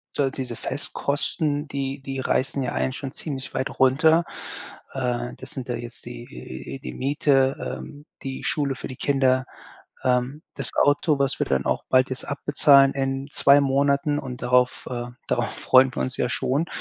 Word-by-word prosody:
so 145 - +2
halt 135 - -1
diese 125 -3 -4
Festkosten, 145 +3 -2
die 135 0 -3
die 135 -1 -5
reißen 135 +1 +1
ja 125 - -2
einen 130 - 0
schon 135 -1 -5
ziemlich 135 -4 -5
weit 130 - -3
runter. 160 +6 +5 0.7
Äh, 125 -2 -2
das - - -9
sind 130 -3 -6
da - - 0
jetzt 120 +2 -8
die 120 - -8
die - - -5
Miete, 135 -1 +2 0.2
ähm, 145 +1 -11 0.2
die 135 -1 -5
Schule 140 -4 0
für - - -7
die 130 - -8
Kinder, 130 -2 +2 0.6
ähm, 130 +4 +1
das - - -1
Auto, 145 +1 +3
was 140 -1 +1
wir - - +1
dann 65 0 0
auch - - 0
bald 130 0 +4
jetzt 130 - -4
abbezahlen 140 -1 +5
in 135 0 -2
2 140 +1 +6
Monaten 140 +1 +2
und 125 -3 -7
darauf, 125 0 +2
äh, 120 -1 -3 0.2
darauf - - 0
freuen 130 0 +4
wir - - -3
uns 130 - -2
ja - - 0
schon. 135 +5 0
135 Hz, 175 wpm, -24 LUFS, 130-140 Hz, 0.7 s, 2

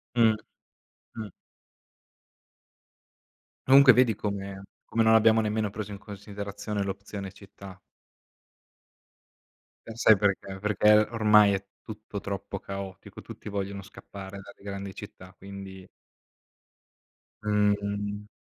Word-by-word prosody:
Mh. 115 -2 +5 0.8
Mh. 110 -2 -6 2.4
Comunque, 135 0 +9
vedi 125 -2 +4
come 100 -1 -5 0.3
come 115 - +2
non 110 0 +5
abbiamo 110 0 +5
nemmeno 105 0 0
preso 105 +1 -6
in 100 - -7
considerazione 100 +1 -6
l'opzione 100 0 -5
città? 95 -1 -13 2.1
E 115 - -7
sai 110 -2 +6
perché? 95 -1 -1
Perché 105 +1 +3 0.2
ormai 105 -3 +5
è 95 0 -2 0.2
tutto 110 -2 -7
troppo 100 0 -5
caotico. 95 -1 -8
Tutti - - -10
vogliono 100 -1 -4
scappare 100 +1 -10
dalle 100 - -15
grandi 100 -1 -6
città, 95 -2 -11
quindi 95 -1 -10 1.6
Mh-mh. 105 0 0
100 Hz, 100 wpm, -27 LUFS, 100-105 Hz, 2.4 s, Comunque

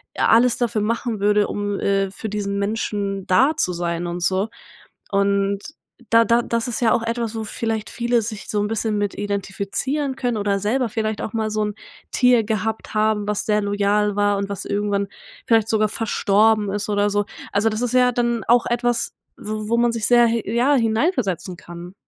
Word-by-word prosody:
alles 235 +1 +4
dafür 235 -3 0
machen 230 0 -1
würde, 205 +1 +3
um, 205 -1 -3
äh, 195 -1 +1
für 215 +3 -6
diesen 200 -1 -2
Menschen 200 -2 -2
da 260 +11 +4
zu 180 - 0
sein 170 0 -2
und 175 +1 -4
so.“ 190 +4 +1 0.6
Und 200 0 +1 0.5
da 230 0 +5
da 235 +1 +3
das 230 0 -1
ist 245 0 -3
ja 225 - +4
auch 230 - +1
etwas, 230 -1 -2
wo 220 - -3
vielleicht 220 -1 -3
viele 240 0 0
sich 215 -1 -7
so 210 - 0
'n 205 - 0
bisschen 220 0 -1
mit 205 -1 -1
identifizieren 205 +8 -2
können 245 -3 -1
oder 200 -1 0
selber 230 +5 0
vielleicht 220 -1 -2
auch 215 - -5
mal 220 -1 -1
so 215 0 0
'n 210 -1 -4 0.4
Tier 250 -3 +4
gehabt 220 +1 -3
haben, 215 -1 +1
was 210 -1 -1
sehr 210 -1 +2
loyal 205 0 +1
war 205 0 +2
und 200 0 -3
was 200 - -5
irgendwann 200 0 -1 0.4
vielleicht 225 -2 +3
sogar 215 -1 +2
verstorben 215 -1 +2
ist 205 +1 -3
oder 205 0 +2
so. 205 0 +1 0.3
Also, 205 +2 +2
das 215 +2 -3
ist 245 0 -1
ja 250 0 +4
dann 235 -1 0
auch 240 0 +4
etwas, 240 0 0 0.2
w - - -11 0.2
wo 235 - +2
man 240 0 +3
sich 225 -2 -2
sehr 240 -1 +6
hi 230 0 0
ja, 245 +5 +2
hineinversetzen 225 - 0
kann. 175 +2 -10
215 Hz, 195 wpm, -21 LUFS, 200-230 Hz, 0.6 s, sehr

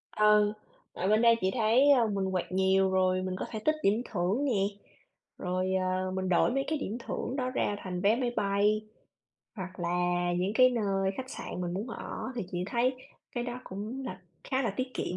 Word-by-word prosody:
Ừ, 210 0 +5 0.4
ở 185 - -2
bên 215 +2 +4
đây 230 -1 +6
chị 190 - +2
thấy, 245 +4 +4
ơ, 245 -5 +5
mình 195 -2 -1
quẹt 185 -1 -2
nhiều, 190 0 +3
rồi 185 0 +2
mình 185 0 -3
có - - -2
thể 220 - -4
tích 310 - +4
điểm 210 +4 +3
thưởng 200 +8 0
nè. 230 -8 +1 0.8
Rồi, 185 +1 -1
à, 185 0 0
mình 190 0 -2
đổi 180 +6 +3
mấy 270 +2 0
cái 310 - 0
điểm 225 -4 -3
thưởng 250 +1 -4
đó 255 -2 -1
ra 230 -5 0
thành 180 -2 -4
vé 205 +3 +4
máy 245 -1 -1
bay, 205 +2 +1 0.7
hoặc 185 -1 -7
là 175 0 0
những 185 +3 0
cái 255 +2 +6
nơi 195 -5 0
khách 260 0 -6
sạn 180 - -6
mình 175 -1 -2
muốn 205 +6 -3
ở. - - -6
Thì 235 - -1
chị 175 - -2
thấy 245 +4 +1 0.4
cái 240 -1 -1
đó 245 0 -5
cũng 215 +8 -6
là 185 -5 -6 0.2
khá 265 0 0
là 230 - 0
tiết 255 0 -3
kiệm. 180 - -2
205 Hz, 210 wpm, -30 LUFS, 185-240 Hz, 0.8 s, đây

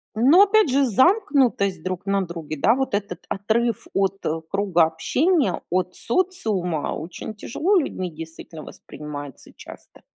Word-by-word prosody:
Но 275 - +6
опять 415 -4 +3
же 275 +1 +3
замкнутость 260 - +2
друг 185 0 -4
на 195 0 +1
друге, 165 -3 -7
да, 225 - +4
вот 265 -4 -2
этот 200 -4 -3
отрыв 220 +3 -1
от, 195 0 -1
э, 160 +1 -1
круга 195 -4 +2
общения, 255 - 0
от 180 0 -1
социума 215 - -1
очень 180 +6 -7
тяжело 335 - -1
людьми 185 - -2
действительно 160 0 -10
воспринимается 145 -2 -9
часто. - - -14
200 Hz, 135 wpm, -23 LUFS, 170-265 Hz, -, Но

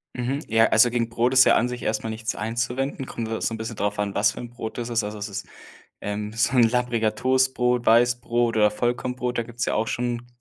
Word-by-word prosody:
Mhm. 130 +3 -2
Ja, 115 0 +4
also 115 +2 +5
gegen 115 -1 -1
Brot 120 +2 0
ist 130 0 +7
ja - - +5
an 120 +2 +2
sich 125 0 -6
erstmal 110 +1 -2
nichts 110 0 -3
einzuwenden. 125 +4 -3
Kommt 115 -1 -5
ja 110 - -3
so 115 - -1
'n - - -4
bisschen 110 0 -6
darauf 105 0 -2
an, 100 -1 -2
was 105 +1 +3
für - - -8
'n 120 - -8
Brot 115 -2 -7
es 120 0 -4
ist. 115 -1 +1
Also 105 0 -5
es 105 +1 -4
ist, 100 - -6 0.6
ähm, 105 +1 -4
so 115 +3 +1
'n 120 - +6
labbriger 115 -2 +1
Toastbrot, 125 0 +1
Weißbrot 120 0 +3
oder 105 -1 +4
Vollkornbrot. 125 +2 -2
Da - - +2
gibt's 120 +1 -4
ja - - -1
auch 110 - 0
schon, 120 0 -3
115 Hz, 235 wpm, -24 LUFS, 110-125 Hz, 0.6 s, ist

